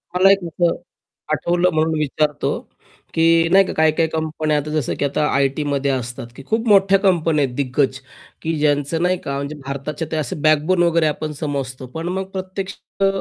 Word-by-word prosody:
मला 190 +2 +6
एक 195 - +4
असं 170 +1 +1 0.6
आठवलं 175 +1 +2
म्हणून 160 +1 +1
विचारतो 150 0 0 0.6
की 165 - +1 0.3
नाही 195 +1 +7
का - - -4
काही-काही 160 +1 +2
कंपन्या 155 -1 -1
आता 150 +1 -3
जसं 155 -5 -1
की 145 - +1
आता 140 +2 0
आयटीमध्ये 140 0 0
असतात 125 -1 -4
की 135 - -10
खूप 225 +1 0
मोठ्या 195 -1 +5
कंपन्या 165 -6 +2
आहेत 125 -1 -7
दिग्गज, 130 -1 0 0.4
की 165 +1 -2
ज्यांचं 145 +2 +1
नाही 180 0 +2
का 140 - -2
म्हणजे 140 +2 -4
भारताच्या 140 +3 -4
ते 160 - -1
असं 150 0 -3
बॅकबोन 155 +4 +3
वगैरे 170 -2 +3
आपण 155 +1 -3
समजतो. 135 -3 -3
पण 160 +6 -6
मग 190 +1 -2
प्रत्यक्षात 190 +1 -3
155 Hz, 175 wpm, -20 LUFS, 140-175 Hz, 0.6 s, नाही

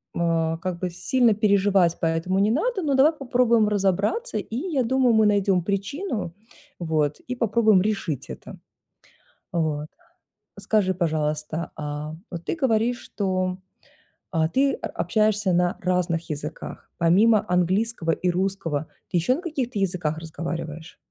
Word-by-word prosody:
а, 165 -1 +1
как 180 -1 -4
бы 185 - -2
сильно 230 +6 +2
переживать 200 -4 +3
по - - -1
этому 165 +4 0
не 210 +2 +3
надо, 395 - 0
но 285 -4 +1
давай 295 +5 +5
попробуем 245 -6 +2
разобраться 205 - 0
и, 225 - -5
я 290 -4 0
думаю, 255 0 +3
мы 220 -1 +5
найдем 195 -3 +2
причину. 200 - -3 0.5
Вот. 155 -3 0
И 250 - -5
попробуем 220 -4 +3
решить 195 - -2
это. - - -9 0.9
Вот. 155 -3 -1 0.7
Скажи 195 -4 +1
пожалуйста, 155 -1 -1
а, 150 +1 -5 0.2
вот 170 -2 -6
ты - - -1
говоришь, 245 -4 +1
что, 185 -2 -2 0.7
а, 160 -2 +2
ты 275 +4 +2
о - - -4
общаешься 210 0 +1
на 175 0 +1
разных 175 -2 0
языках. 150 +1 -6
Помимо 210 +6 +4
английского 180 0 +1
и 180 +2 0
русского, 175 -5 -1 0.2
ты 180 - 0
еще 250 +10 +2
на 340 - -6
каких-то 270 - -3
языках 175 -5 -1
разговариваешь? 165 0 -6
190 Hz, 140 wpm, -24 LUFS, 165-225 Hz, 0.9 s, давай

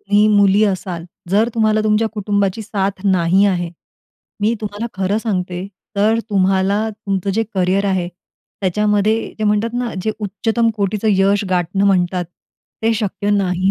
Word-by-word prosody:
तुम्ही 205 +1 +3
मुली 205 0 +4
असाल, 185 -4 -2 0.3
जर 215 +4 +3
तुम्हाला 215 -1 +2
तुमच्या 215 +1 +2
कुटुंबाची 205 0 -1
साथ 200 -1 -3
नाही 185 0 +3
आहे, 175 -3 0 0.7
मी 220 +3 +2
तुम्हाला 210 +2 -4
खरं 195 +3 0
सांगते, 185 -4 -3 0.3
तर 215 +3 +3
तुम्हाला 195 +2 +2
तुमचं 200 -2 -3
जे 225 - +2
करियर 190 +2 +1
आहे, 185 -3 0 0.5
त्याच्यामध्ये 210 +3 +1
ते 215 - -1
म्हणतात 210 +2 +1
ना, 245 -2 -2
जे 220 - 0
उच्चतम 225 +3 0
कोटीचं 205 +1 0
यश 195 +1 +2
गाठणं 180 +2 +1
म्हणतात, 180 -2 +1 0.6
ते 225 +1 +3
शक्य 205 -1 -2
नाही 190 -2 +1
200 Hz, 145 wpm, -18 LUFS, 190-215 Hz, 0.7 s, मुली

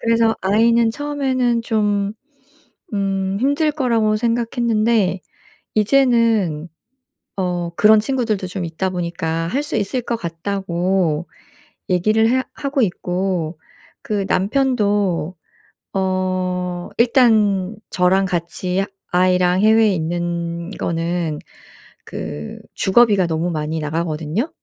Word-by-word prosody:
그래서 230 -1 +2
아이는 225 +3 +3
처음에는 260 -4 -1
좀 205 -3 0 0.8
음 195 -1 -1
힘들 285 +4 +2
거라고 230 -7 +1
생각했는데 230 -3 +1 0.5
이제는 220 - +2 0.7
어 175 -2 -2
그런 215 0 +6
친구들도 220 -6 -1
좀 180 0 -4
있다 170 +3 -2
보니까 165 -2 -2
"할 270 +12 -1
수 295 - -3
있을 215 +5 -1
것 235 0 -2
같다."고 175 -2 -1 0.6
얘기를 215 +5 +3
해 260 +1 +2
하고 280 -2 -1
있고 180 -3 -2 0.4
그 200 -2 -2
남편도 205 - +1 0.6
어 185 -2 -1
일단 220 -6 +3
저랑 185 +1 +2
같이 180 +2 -2 0.3
아이랑 180 0 +3
해외에 220 -1 +4
있는 170 +1 -3
거는 165 -3 -2 0.7
그 75 -1 -6 0.2
주거비가 200 -3 +4
너무 165 +2 -1
많이 155 0 -2
나가거든요. 160 - -2
195 Hz, 215 characters per minute, -20 LUFS, 175-225 Hz, 0.8 s, 그런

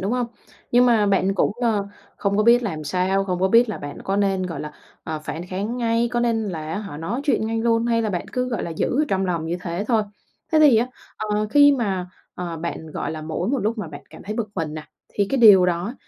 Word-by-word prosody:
đúng 195 +4 -1
hông? 250 -1 0 0.4
Nhưng 245 +1 +5
mà 225 -4 +4
bạn 195 -1 +2
cũng, 195 - +1
ờ, 215 -4 +1 0.3
không 200 -1 0
có 215 - +3
biết 235 +2 +5
làm 160 -9 -4
sao, 185 +5 0
không 180 -2 -2
có 190 - +3
biết 230 +4 +5
là 215 - -4
bạn 145 0 -7
có 195 - -1
nên, 195 -2 +1
gọi 165 -5 -5
là, 150 0 -6 0.3
ờ, 155 -1 -3
phản 165 +4 -5
kháng 200 +6 -3
ngay, 230 -1 +1
có 240 - +1
nên 225 -3 0
là, 160 -3 -5
á - - -2
hả, 200 -8 -7
nói 165 - -3
chuyện 275 -6 +1
ngay 225 0 -1
luôn 230 0 +1
hay 230 -1 +2
là 215 - -1
bạn 175 -3 -3
cứ, 250 0 -1
gọi 235 -5 -2
là, - - -4
giữ 245 - 0
ở - - +2
trong 195 0 0
lòng 170 -3 -2
như 170 +2 -2
thế 175 +3 -3
thôi. 225 -3 +3 0.5
Thế 315 - +5
thì 290 -6 +7
á, 230 +2 +2 0.3
ờ, 210 0 -1
khi 285 +2 +7
mà, 190 -6 -1 0.3
ờ, 175 -2 -5
bạn, 160 0 -5
gọi - - -4
là, 155 -1 -6
mỗi 160 +4 -3
một 275 +2 +1
lúc 220 +1 -1
mà 205 - -4
bạn 145 -2 -10
cảm 160 - -12
thấy 210 +2 -5
bực 220 -2 -2
mình 160 -4 -3
nè 155 -1 -6 0.2
thì 200 - -1
cái 270 - +1
điều 200 -5 +8
đó 180 +7 -1
200 Hz, 265 wpm, -22 LUFS, 175-230 Hz, 0.5 s, điều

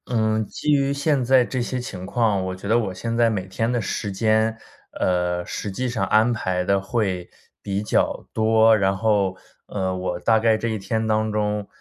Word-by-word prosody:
嗯， 110 -1 +1
基 150 - -2
于 140 -1 +2
现 140 -2 +1
在 130 0 +5
这 130 +1 -3
些 125 +1 -3
情 95 -7 -7
况， 105 -2 +1
我 95 - -3
觉 95 +2 -8
得 115 - +3
我 105 -6 -1
现 115 +5 -4
在 115 -1 +4
每 100 -4 -3
天 115 +5 -1
的 120 -2 0
时 100 +1 -3
间， 110 +2 +1 0.4
呃， 90 -1 0
实 105 - -5
际 125 +6 -2
上 110 -5 -1
安 110 +4 +4
排 95 -5 -1
得 100 +2 +2
会 95 -3 -2 0.3
比 100 0 -2
较 105 - 0
多， 110 0 +4
然 95 -1 +1
后， 100 -2 +1 0.3
呃， 95 -2 -2
我 90 -1 -3
大 110 +2 +3
概 110 -1 +3
这 115 - -3
一 110 - -1
天 110 +3 -2
当 110 0 +1
中， 105 -1 -1
110 Hz, 215 characters per minute, -23 LUFS, 95-115 Hz, 0.4 s, 在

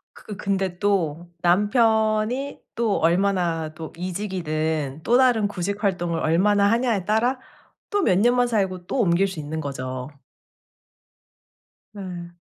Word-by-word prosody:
그 210 - -9
근데 190 -2 -2
또 175 -5 0
남편이 220 +6 +2 0.2
또 225 -3 +1
얼마나 170 -2 +1
또 160 0 -8
이직이든 160 -6 -3
또 240 - +4
다른 240 -5 +3
구직 200 +1 -4
활동을 175 -4 0
얼마나 200 +6 +3
하냐에 230 -4 +1
따라 230 +6 +1 0.5
또 410 -1 +1
몇 185 - +3
년만 245 +3 +3
살고 190 -5 -1
또 265 - -1
옮길 190 -1 +3
수 190 -3 -7
있는거죠. 135 -4 -5 1.9
예. 175 -3 -7
190 Hz, 225 characters per minute, -23 LUFS, 170-215 Hz, 1.9 s, 또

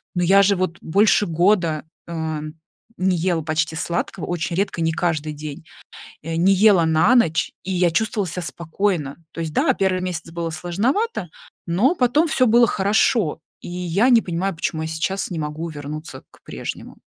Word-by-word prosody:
Но 175 - +1
я 195 +3 +6
же 200 +1 +3
вот 180 -2 -2
больше 205 +4 +3
года, 170 -2 +2 0.2
ам, 160 -2 -4 0.5
не 185 0 +2
ела 170 -1 0
почти 160 0 -1
сладкого, 170 +2 -3
очень 170 -1 -3
редко, 190 -2 -1
не 165 0 +1
каждый 160 -2 -1
день. 150 0 -8 0.6
Не 165 +4 +1
ела 195 -2 +5
на 160 +10 +4
ночь, 165 -10 +2
и 190 - -4
я 180 -1 +2
чувствовала 210 +1 0
себя 175 +2 -4
спокойно. 170 -3 -2 0.2
То - - -9
есть, 160 -2 -4
да, - - +3
1 190 -1 0
месяц 175 -2 -4
было 170 0 -3
сложновато, 195 - -1 0.4
но 205 - +2
потом 290 +4 +2
всё 255 -4 +2
было 235 +1 +5
хорошо, 200 - +1 0.2
и - - -8
я 180 +6 +1
не 235 -3 +6
понимаю, 185 +2 -2
почему 160 0 -2
я 160 - -3
сейчас 175 +5 -2
не 170 - -3
могу 155 +2 -4
вернуться 150 +1 -8
к - - -22
прежнему. - - -7
175 Hz, 170 wpm, -21 LUFS, 160-195 Hz, 0.6 s, я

